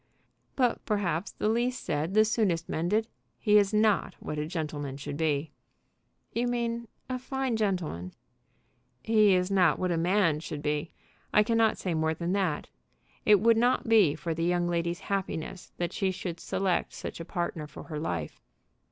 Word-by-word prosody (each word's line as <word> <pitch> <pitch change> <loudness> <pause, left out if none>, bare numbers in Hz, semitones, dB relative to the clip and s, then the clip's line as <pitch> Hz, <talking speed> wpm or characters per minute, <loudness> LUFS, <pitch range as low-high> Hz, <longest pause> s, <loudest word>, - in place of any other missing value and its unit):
"But 250 -3 +1
perhaps 195 -4 -1
the - - -2
least 240 +3 0
said 155 +6 -2
the 215 0 +6
soonest 200 -7 +1
mended. 210 +8 0 0.3
He 210 +7 +5
is 200 -1 +2
not 215 -2 +2
what 150 - -4
a 150 - -2
gentleman 150 -5 -4
should 140 0 -5
be." 150 -1 0 0.8
"You 240 +1 0
mean 235 -1 -2 0.2
a 255 -1 -3
fine 265 -1 -2
gentleman." 180 - -2 0.9
"He 215 -3 +5
is 180 +1 0
not 180 -5 +4
what 185 -1 -1
a 170 - +1
man 170 -2 +2
should 155 -2 -6
be. 150 +2 -1 0.4
I 210 - +5
cannot 225 -1 +2
say 180 - -2
more 160 0 +1
than 170 +3 -2
that. 185 -7 0 0.6
It 210 -2 +7
would 230 0 +5
not 245 +1 +2
be 210 -10 +5
for 165 0 -3
the 165 +1 -2
young 175 0 +1
lady's 170 0 -1
happiness 190 -2 -4
that 175 0 -2
she 195 - 0
should 180 -2 -4
select 190 -2 -1
such - - -6
a - - -4
partner 170 -2 -3
for 150 - -10
her 155 -3 -5
life." 85 - -4
180 Hz, 170 wpm, -29 LUFS, 160-215 Hz, 0.9 s, It